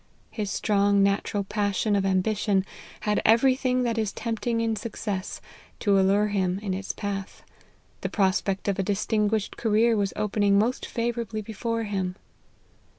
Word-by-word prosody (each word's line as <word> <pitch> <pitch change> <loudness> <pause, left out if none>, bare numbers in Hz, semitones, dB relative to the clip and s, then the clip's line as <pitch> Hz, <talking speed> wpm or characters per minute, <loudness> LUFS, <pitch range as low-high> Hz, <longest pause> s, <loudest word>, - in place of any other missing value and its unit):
His 210 -3 -3
strong 200 -1 +2
natural 200 +1 0
passion 205 +1 0
of 195 -1 +1
ambition 195 +1 +1 0.4
had 210 -1 +1
every 235 +4 +5
thing 255 -1 0
that 230 -2 0
is 215 -2 0
tempting 230 0 -2
in 225 -1 0
success, 205 -3 -4 0.4
to 200 -2 +3
allure 200 +2 +3
him 190 -2 0
in 195 -3 -1
its 195 +1 -3
path: 200 -2 -5 0.6
the - - -2
prospect 195 -1 0
of 200 -1 0
a - - +4
distinguished 210 +1 0
career 225 +1 +3
was 200 -2 0
opening 205 -1 +2
most 230 +5 0
favourably 230 -2 -2
before 230 +2 -3
him. 190 -3 -2
205 Hz, 150 wpm, -26 LUFS, 195-225 Hz, 0.6 s, every